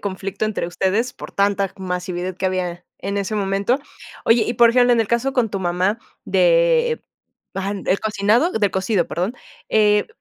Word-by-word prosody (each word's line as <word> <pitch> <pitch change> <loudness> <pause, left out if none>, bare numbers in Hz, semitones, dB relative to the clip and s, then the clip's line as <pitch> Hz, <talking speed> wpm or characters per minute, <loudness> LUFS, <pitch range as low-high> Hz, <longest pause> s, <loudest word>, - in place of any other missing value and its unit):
conflicto 195 +1 -4
entre 215 -5 -2
ustedes 195 +7 0
por - - -10
tanta 200 -1 +1
masividad 180 -1 -4
que 190 - -1
había 180 -1 -3
en 200 +1 -4
ese 200 +2 -2
momento. 200 +5 0 0.5
Oye, 230 0 +4
y 235 - -1
por 235 0 +6
ejemplo, 245 0 +4
en 235 - +3
el 220 - -1
caso 235 +3 0
con 245 -5 +1
tu 195 - -2
mamá, 185 +5 0 0.3
de, - - +3 0.5
ah, 195 +1 -2
el 195 - +1
cocinado, 215 - +2
de 205 -3 +1
cocido, 190 -1 0
perdón, 185 +9 -2 0.3
eh, 210 -1 +3
200 Hz, 170 wpm, -21 LUFS, 190-235 Hz, 0.5 s, por